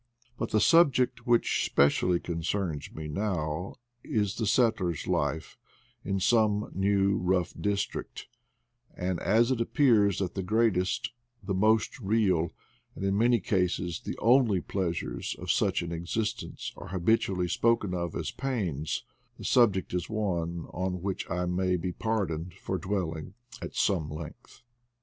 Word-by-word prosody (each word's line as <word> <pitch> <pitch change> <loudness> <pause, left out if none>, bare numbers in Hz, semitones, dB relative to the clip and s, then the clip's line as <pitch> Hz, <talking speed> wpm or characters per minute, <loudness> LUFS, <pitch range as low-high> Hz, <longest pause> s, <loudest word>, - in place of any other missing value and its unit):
But 115 - -3
the 110 - +2
subject 130 -6 +4
which 120 -1 +3
specially 85 +5 +3
concerns 85 -2 -3
me 80 - -7
just 75 - -5
now 90 -4 -2 0.3
is 105 -3 0
the 110 - -1
settler's 100 - +1
life 80 - -2 0.4
in 95 0 -1
some 105 0 +2
new 100 0 +2
and 90 - -4
rough 90 -2 +1
district; 100 0 -2 0.7
and 90 -1 -2
as 115 +4 +3
it 125 -3 0
appears 115 - +3
that 90 -3 -2
the 95 - -3
greatest, 95 -2 +1 0.3
the 95 0 -2
most 110 +6 +2
real, 95 -6 +2 0.5
and 95 - -4
in 95 0 +1
many 120 +3 +4
cases 90 -3 -1
the - - -5
only 115 -4 +4
pleasures 85 -9 -3
of - - -1
such - - +1
an 85 - -5
existence 105 +7 -3
are - - -9
habitually 95 -1 +1
spoken 105 0 +1
of 85 -2 -3
as 80 -3 -3
pains, 95 - -2 0.3
the - - -10
subject 105 -8 +3
is 90 -1 -2
one. 85 -6 -2
on 90 0 -3
which 95 -1 -3
I 90 +1 -1
may 90 +1 +1
be 90 +1 -3
pardoned 90 -6 -2
for - - -4
dwelling 90 -3 -3 0.3
at - - -7
some 85 -7 +1
length. 80 +11 -9
95 Hz, 145 wpm, -29 LUFS, 85-110 Hz, 0.7 s, subject